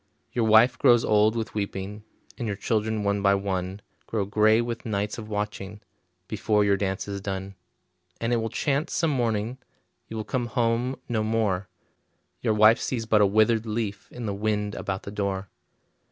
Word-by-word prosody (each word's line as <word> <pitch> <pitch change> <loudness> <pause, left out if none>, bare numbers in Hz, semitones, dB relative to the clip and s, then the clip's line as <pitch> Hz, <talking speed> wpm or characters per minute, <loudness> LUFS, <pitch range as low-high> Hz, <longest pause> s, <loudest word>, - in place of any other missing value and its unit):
Your 120 -2 +1
wife 110 +3 +5
grows 120 -3 +5
old 105 +1 +4
with 115 -1 -3
weeping, 100 0 -4 0.3
And 120 - -4
your 100 -2 -2
children 110 0 0
one 100 0 +1
by 100 0 +4
one 95 0 -3 0.2
Grow 105 -3 -1
gray 110 +2 +4
with 120 -1 -3
nights 105 0 -2
of 110 -1 -8
watching, 105 -1 -4 0.5
Before 105 -1 +1
your 100 -1 +4
dance 95 0 -2
is 100 -1 -4
done. 95 0 -4 0.7
And 115 +1 0
it - - +3
will 115 0 -1
chance 140 +5 -1
some 165 -2 +2
morning 120 -1 -1 0.5
You 110 - -6
will 110 - -2
come 120 +2 -2
home 115 +3 0
no 115 -3 0
more; 105 -4 0 0.7
Your 110 - +1
wife 110 +2 +6
sees 115 -3 -2
but 110 -1 +4
a 100 - +6
withered 110 +2 +3
leaf 105 -2 -3
In 120 -2 -6
the 100 - -2
wind 105 0 -1
about 95 -1 -4
the 100 - -7
door. 100 -2 -2
105 Hz, 180 wpm, -26 LUFS, 100-115 Hz, 0.7 s, wife